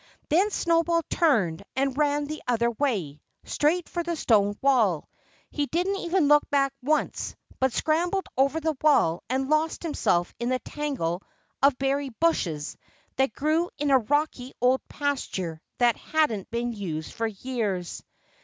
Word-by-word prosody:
Then 370 +7 +3
Snowball 335 -3 +1
turned 205 - +2
and 270 0 0
ran 290 0 +1
the 310 +1 -6
other 235 -1 +2
way, 210 - -2 0.2
straight 325 +4 +1
for 345 - -3
the 340 0 -2
stone 205 -8 +2
wall. 225 - +2 0.4
He 290 -1 -1
didn't 365 +6 0
even 350 -3 +1
look 295 0 +4
back 275 -1 +2
once, 300 +4 -1 0.2
but 265 0 +2
scrambled 345 +8 0
over 275 +4 +2
the 315 -1 -1
wall 225 - +3
and 265 +1 0
lost 310 +3 +1
himself 175 - 0
in 240 +1 -1
the 255 - +2
tangle 255 - -3 0.4
of 275 -2 +4
berry 275 +1 0
bushes 170 - 0 0.4
that 265 -4 +2
grew 315 +6 +1
in 290 -1 0
a 265 - +6
rocky 265 +1 -1
old 255 +2 +3
pasture 190 - -3 0.2
that 240 -1 +3
hadn't 300 -11 0
been 235 +1 -2
used 165 -7 -5
for 225 - -1
years. 210 -5 -3
275 Hz, 150 wpm, -26 LUFS, 225-310 Hz, 0.4 s, a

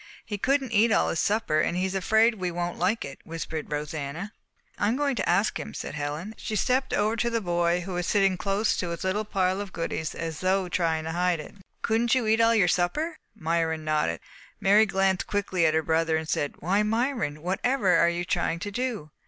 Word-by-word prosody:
"He 205 -2 -4
couldn't 270 +1 +1
eat 225 +1 +4
all - - +3
his 165 - -1
supper, 205 -7 +1
and 175 - 0
he 185 - +1
is 190 - -2
afraid 220 +5 +3
we 185 -4 -3
won't 175 0 -3
like 195 +6 +1
it," 140 -1 -9
whispered 160 -2 -5
Rosanna. 150 +5 -4 0.5
"I 205 - +2
am 225 - +2
going 280 -1 0
to - - -1
ask 195 +5 +2
him," - - -7
said - - -5
Helen. 150 +7 -4
She 215 - -4
stepped 255 +5 +1
over 215 +2 +1
to 235 +2 +1
the 230 -1 0
boy, 175 -2 +1
who 185 +1 -6
was 175 0 -2
sitting 195 -2 +3
close 200 +3 0
to 175 - -2
his 170 -1 -4
little 195 +3 0
pile 190 -1 0
of 200 -2 -7
goodies 165 -2 -3
as 160 -2 -4
though 185 0 +1
trying 165 -3 0
to 160 - -4
hide 175 0 +1
it. 155 - -9 0.3
"Couldn't 230 +2 +2
you 255 -3 +1
eat 220 +1 +3
all 230 0 +5
your 200 -5 +4
supper?" 300 - 0 0.2
Myron 160 -1 -1
nodded. 150 - 0 0.4
Mary 210 +3 +5
glanced 190 -1 +1
quickly 190 -4 +1
at 155 - +1
her 160 - +2
brother, 160 0 +1
and 160 0 -4
said, 145 -2 -1
"Why, 190 +6 +2
Myron, 220 - -1
whatever 195 +2 +1
are 170 - +5
you 175 +1 -2
trying 175 -2 0
to 205 - -4
do?" 225 -9 -3
185 Hz, 220 wpm, -26 LUFS, 165-215 Hz, 0.5 s, all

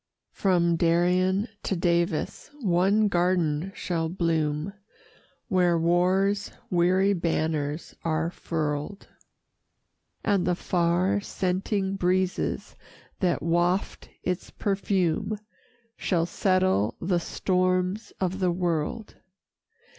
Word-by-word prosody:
From 170 -3 +2
Darien 180 +4 +2
to 195 - -1
Davis 170 -2 0
one 200 0 +3
garden 175 -2 +1
shall 165 -2 -2
bloom, 160 0 -1 0.7
Where 180 -2 +3
war's 185 +4 +2 0.2
weary 185 +3 +3
banners 160 -3 -1
are 165 0 0
furl'd, 155 +3 -3 1.1
And 200 -4 +1
the 180 - +2
far 180 +3 +1
scenting 195 +1 -1
breezes 185 0 0 0.4
that 180 -2 +1
waft 175 +3 0
its 180 0 -2
perfume, 200 0 0 0.6
Shall 170 -3 +1
settle 185 - +1
the 175 0 +1
storms 185 +3 0
of 185 0 -1
the 185 -2 +2
world. 175 +4 -2
180 Hz, 90 wpm, -26 LUFS, 170-190 Hz, 1.1 s, one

